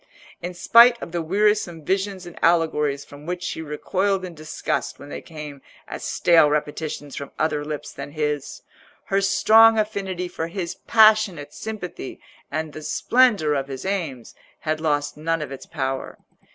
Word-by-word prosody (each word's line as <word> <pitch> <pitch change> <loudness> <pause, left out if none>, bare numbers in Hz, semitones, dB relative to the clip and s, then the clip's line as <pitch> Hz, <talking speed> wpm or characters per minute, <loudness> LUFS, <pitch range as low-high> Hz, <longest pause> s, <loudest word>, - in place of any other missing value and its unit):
In 180 +1 -5
spite 235 +6 +6
of - - -7
the 170 0 -2
wearisome 195 -2 +1
visions 190 0 -1
and 175 - -10
allegories 150 -4 +2
from 145 +2 -13
which 180 0 -3
she 160 - -3
recoiled 185 +5 -1
in 180 - -8
disgust 155 -1 -3
when 140 - -12
they - - -6
came 150 -4 -9 0.3
as - - -7
stale 165 -3 +4
repetitions 150 -1 -3
from 140 - -6
other 155 -2 0
lips 150 0 -5
than 140 +1 -8
his, 150 -2 -3 0.5
her 195 0 +2
strong 225 +3 +6
affinity 195 -4 -2
for 165 -2 -4
his 170 0 -4
passionate 215 -8 +3
sympathy 200 -10 -6 0.3
and 155 0 -3
the 155 - -8
splendour 210 -4 +3
of 135 -1 -1
his 135 +2 -7
aims 165 - -3 0.3
had 155 0 -2
lost 145 -2 0
none 165 +2 -1
of 150 -3 -5
its 135 - -8
power. 135 -4 -3
165 Hz, 160 wpm, -23 LUFS, 150-195 Hz, 0.5 s, spite